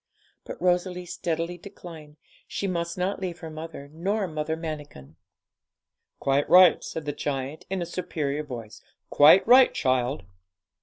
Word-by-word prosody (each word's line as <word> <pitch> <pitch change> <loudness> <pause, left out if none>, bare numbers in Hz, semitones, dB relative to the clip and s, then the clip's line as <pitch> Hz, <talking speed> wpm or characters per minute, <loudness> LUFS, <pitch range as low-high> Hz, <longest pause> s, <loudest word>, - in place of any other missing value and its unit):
But - - -8
Rosalie 180 0 0
steadily 170 0 -3
declined; 160 -5 -12 0.3
she - - -4
must 170 -2 -2
not 185 +2 -1
leave 180 -3 -4
her 160 -1 -7
mother 155 -2 -8
nor 195 +5 -1
Mother 155 0 -3
Manikin. 145 - -8 1.0
'Quite 140 +1 +1
right,' 180 -2 +7
said 160 - -6
the 145 - -1
giant, 140 0 -4
in 190 -2 -2
a - - -4
superior 155 -5 -3
voice; 120 -7 -9 0.3
'quite 150 +6 +7
right, 255 +2 +7
child.' 130 0 0
160 Hz, 140 wpm, -26 LUFS, 145-180 Hz, 1.0 s, right